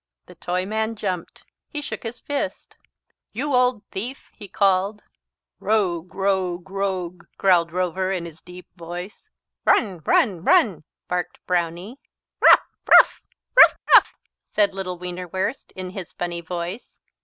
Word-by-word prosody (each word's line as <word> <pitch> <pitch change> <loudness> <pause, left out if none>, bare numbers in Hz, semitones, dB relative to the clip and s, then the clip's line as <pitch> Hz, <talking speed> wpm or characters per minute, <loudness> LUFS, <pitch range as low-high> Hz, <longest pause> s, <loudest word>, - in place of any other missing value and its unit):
The 180 - -14
Toyman 200 +6 -2
jumped. 180 -5 -5 0.2
He 295 - -5
shook 290 - -6
his 235 +1 -7
fist. 285 -1 -4 0.6
"You 275 +6 -2
old 250 -3 +2
thief!" 240 +8 -6
he 205 - -11
called. 195 +2 +1 0.6
"Rogue, 185 -5 -1
rogue, 190 -2 -1
rogue!" 185 -3 -3
growled 175 -3 +3
Rover 185 +1 -1
in 180 -3 -2
his 165 -1 -11
deep 180 0 -12
voice. 175 - -8 0.3
"Run, 195 -6 +2
run, 180 +1 +2
run!" 215 - +3 0.2
barked 180 0 -3
Brownie. 180 +7 -2 0.4
"Rough, - - +7 0.2
rough - - +7 0.3
rough, - - +9 0.2
rough!" - - +7 0.4
said 205 -2 +2
little 185 -2 -5
Wienerwurst 180 +6 -4
in 185 -1 -6
his 190 -3 -8
funny 175 -1 -4
voice. 175 +5 -6
185 Hz, 130 wpm, -23 LUFS, 175-210 Hz, 0.6 s, rough